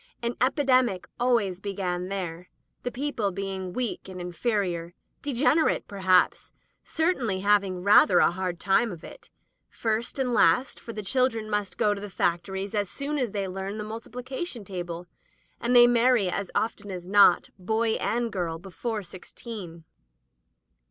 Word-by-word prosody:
Any 235 +1 -1
epidemic 255 - +2
always 225 -7 +1
began 185 -3 -3
there, 180 -3 -5 0.3
the 245 - -2
people 245 -5 -2
being 190 -1 -4
weak 235 -2 -3
and 185 -1 -8
inferior 175 -2 -2
— - - -47
degen 280 +2 +2
erate, 315 - +1
perhaps 185 -2 +2 0.2
— - - -44
certainly 270 - 0
having 195 -3 +2
rather 200 -2 +6
a - - +5
hard 180 -1 -3
time 195 +4 +2
of 170 -3 -9
it, 460 - -12 0.4
first 225 +2 -2
and 255 -2 0
last, 220 +6 +3
for 230 - -8
the 215 -2 -6
children 230 0 +1
must 200 -4 -2
go 210 -1 +3
to 200 - -7
the 205 - -6
factories 190 +3 -1
as 205 -3 0
soon 290 +1 -3
as 250 -3 0
they 200 -1 -3
learn 195 +2 -5
the 210 - -4
multiplication 245 - -6
table, 175 -2 -5 0.5
and 245 +1 +1
they 240 0 +10
marry, 240 -4 +4
as 200 0 -3
often 205 -1 -1
as 180 -2 -6
not, 200 -2 +5
boy 220 +4 0
and 235 0 -1
girl, 170 -4 -2
before 205 +5 -5
sixteen. 180 -1 -9
205 Hz, 160 wpm, -27 LUFS, 185-240 Hz, 0.5 s, they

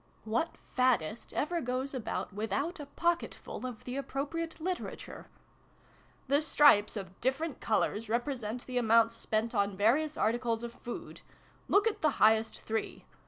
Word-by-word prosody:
(What 230 +10 -1 0.2
faddist 235 -5 +1
ever 340 +3 -1
goes 255 +2 -2
about 235 -5 -3
without 220 - -2
a 290 - -7
pocketful 340 -4 -2
of 240 -4 -8
the 250 +2 -4
appropriate 295 +5 -3
literature 360 +3 -5 0.3
?) - - -32
" - - -32
The 285 +3 +3
stripes 290 -9 +5
of 190 -2 -8
different 270 +4 -1
colours 220 0 0
represent 240 -1 -2
the 250 -1 -1
amounts 230 0 +4
spent 225 0 -1
on 200 -2 +1
various 285 +9 +2
articles 230 +1 0
of 235 0 -5
food. 240 - -8 0.5
Look 405 +1 +4
at 450 - 0
the 305 -3 +3
highest 220 +1 +4
three. 220 0 -3
245 Hz, 150 wpm, -31 LUFS, 220-290 Hz, 0.5 s, stripes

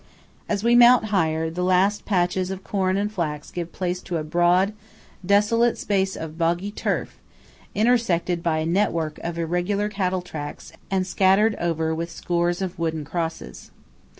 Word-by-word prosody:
As 205 -1 -1
we 235 +1 +4
mount 240 -1 +7
higher, 160 -3 +1
the 180 +2 -3
last 185 +3 +2
patches 180 -1 0
of 190 0 -6
corn 190 -1 0
and 205 +1 -1
flax 155 -7 -4
give 170 -1 -5
place 180 -1 -3
to 175 - -3
a 155 - -3
broad, 175 +5 +2 0.5
desolate 210 +5 +3
space 190 -2 0
of 160 +1 -7
boggy 175 +4 0
turf - - -3 0.6
intersected 200 -7 +1
by 165 -2 0
a 155 - -1
network 165 -3 0
of 170 0 -5
irregular 180 +5 -1
cattle 185 -3 -1
tracks 150 -4 -7 0.2
and 190 -1 0
scattered 195 +4 +3
over 160 -2 -1
with 165 +1 -3
scores 175 +2 -1
of 185 -1 -5
wooden 160 -2 -2
crosses. 160 - -5
180 Hz, 155 wpm, -23 LUFS, 165-200 Hz, 0.6 s, mount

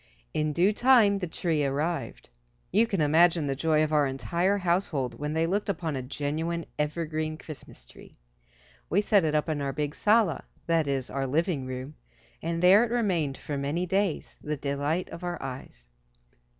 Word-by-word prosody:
In 155 0 0
due 180 +7 +3
time 225 -4 +5
the 180 - -3
tree 160 -2 -1
arrived. 150 +5 -2 0.4
You 220 +5 +4
can 195 -6 -1
imagine 160 +2 +4
the 135 -1 -1
joy 155 +2 +2
of 155 0 -1
our 150 -2 +4
entire 170 +9 0
household 170 -8 -1
when 150 +1 -3
they 160 +1 +1
looked 200 +4 -1
upon 165 -5 -2
a 130 - -2
genuine, 155 +5 -3
evergreen, 155 0 -2
Christmas 150 - -11
tree. - - -16 0.7
We 195 +5 +3
set 205 -3 +3
it 155 -1 0
up 150 - +1
in 155 -3 -1
our 140 -1 -2
big 150 +1 -2
"sala," 210 - +2 0.2
that 165 -3 +1
is 135 -2 -2
our 135 0 -2
living 150 -1 0
room, 130 +3 -6 0.5
and 165 +1 -2
there 195 +5 +7
it 240 - -1
remained 180 - 0
for 145 -2 -4
many 150 +6 -1
days, 190 -1 -1
the 150 0 -3
delight 145 +5 -1
of 170 - -8
our 175 0 -3
eyes. 125 - -8
160 Hz, 175 wpm, -27 LUFS, 145-180 Hz, 0.7 s, there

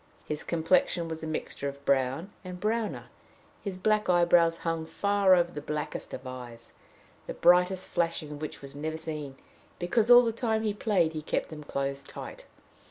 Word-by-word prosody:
His 150 0 -3
complexion 170 +1 +2
was 160 -1 -5
a 160 - -5
mixture 155 -2 -3
of 140 0 -12
brown 135 +7 +1
and 180 -1 -7
browner; 220 +2 -1 0.6
his 195 -3 -4
black 210 +1 +1
eyebrows 170 -1 +4
hung 165 -1 0
far 200 0 +3
over 175 -1 +2
the 150 - -6
blackest 150 0 -4
of 130 - -7
eyes, 120 -2 -9 0.5
the - - -5
brightest 180 +1 +4
flashing 165 -3 -1
of 145 0 -8
which 155 - -6
was 140 0 -9
never 155 +2 -3
seen, 150 -4 -6 0.4
because 215 +6 +1
all 245 0 +10
the 230 - +1
time 220 -1 -1
he 210 -2 0
played 200 -6 +1
he 155 - -4
kept - - -2
them 150 -1 -8
closed 140 -1 -3
tight. - - -8
165 Hz, 175 wpm, -29 LUFS, 150-190 Hz, 0.6 s, all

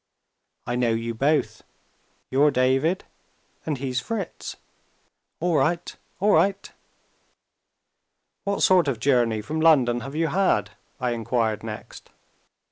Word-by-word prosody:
I 120 - -2
know 125 -1 +1
you 115 +1 -2
both. 145 +6 0 0.7
You're 140 +3 +4
David, 135 +7 +1 0.6
and 150 -3 -1
he's 130 -1 -2
Fritz. 215 -7 -5 0.8
All 170 -1 +1
right! 170 +2 0 0.2
all 205 +2 +3
right!" 200 0 +2 1.7
"What 200 0 -1
sort 180 -4 +5
of 130 -5 -1
journey 120 -4 +2
from 155 +7 -3
London 130 -7 +4
have 135 +4 -8
you 165 0 +1
had?" 185 - +1 0.3
I 125 -1 -1
inquired 115 -2 -1
next. 110 -1 -9
135 Hz, 120 wpm, -24 LUFS, 120-165 Hz, 1.7 s, sort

